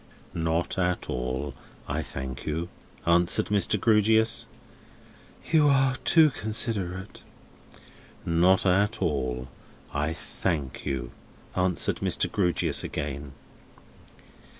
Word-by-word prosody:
"Not 80 +2 -1
at 90 -1 0
all, 65 +3 -3 0.3
I 75 +2 -1
thank 65 -3 -6
you," 80 +3 -2 0.4
answered 85 +1 +3
Mr. 105 +1 +2
Grewgious. 110 +1 +3 1.0
"You 155 -3 +5
are 135 -1 +4
too 160 -1 +5
considerate." 105 -5 -3 1.0
"Not 90 +4 +3
at 100 +4 +2
all, 65 -7 -1 0.5
I 75 +3 0
thank 75 -1 -3
you," 65 -3 -3 0.4
answered 90 -1 +1
Mr. - - 0
Grewgious 90 -4 +1
again. 70 -1 -4
85 Hz, 95 wpm, -27 LUFS, 70-105 Hz, 1.0 s, You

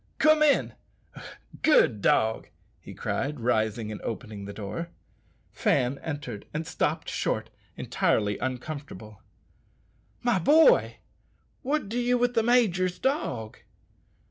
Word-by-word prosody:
Come 310 0 +4
in, 295 -2 +3 0.9
good 125 - +4
dog," 110 +2 +2 0.3
he - - -12
cried, 145 +1 -3
rising 110 -2 0
and 105 - -7
opening 105 -3 -6
the 100 - -7
door. 110 +12 -6 0.6
Fan 125 +2 0
entered 145 -9 -6
and 160 +1 -2
stopped - - -2
short, - - -2 0.3
evidently 105 -2 0
uncomfortable. 130 -5 -6 1.0
"My 240 -6 +2
boy, 320 - +5 0.7
what 290 -4 -1
do 230 +4 -2
ye 245 +1 +2
with 245 0 +1
the 230 - +3
major's 195 -7 +2
dog?" 125 - -2
145 Hz, 115 wpm, -27 LUFS, -, 1.0 s, boy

